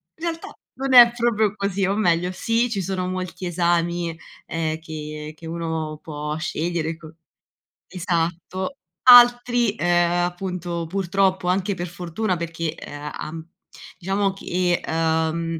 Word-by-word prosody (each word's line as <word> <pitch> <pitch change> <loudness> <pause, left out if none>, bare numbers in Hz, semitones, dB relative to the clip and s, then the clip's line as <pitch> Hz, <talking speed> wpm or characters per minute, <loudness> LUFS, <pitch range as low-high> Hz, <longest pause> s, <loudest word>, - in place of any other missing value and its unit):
In 320 - -14
realtà 330 -1 -4 0.2
non 270 0 -2
è 240 -2 +10
proprio 220 -3 +1
così, 200 -1 -1
o 195 - 0
meglio 180 -4 +1
sì, 230 +5 0
ci 205 -4 -2
sono 185 0 -2
molti 185 0 -4
esami, 170 -1 0 0.3
ehm, 160 -1 -2
che 155 -1 -7
che 165 - -13
uno 160 -2 -3
può 150 -1 -5
scegliere 165 0 -2
co 160 -1 -13 0.7
esatto. 180 +4 -2 0.3
Altri, 245 -2 +7
ehm, 175 -2 +2
appunto, 175 -2 -4
purtroppo, 190 0 0
anche 190 +2 +1
per 175 0 -4
fortuna 180 +3 -3
perché, 165 -1 -3
ehm, 145 -1 -8 0.2
uh 165 - -7
uhm, 165 +1 -9 0.5
diciamo 195 +2 0
che, 180 -2 -1
uhm 160 0 0
175 Hz, 135 wpm, -23 LUFS, 165-195 Hz, 0.7 s, è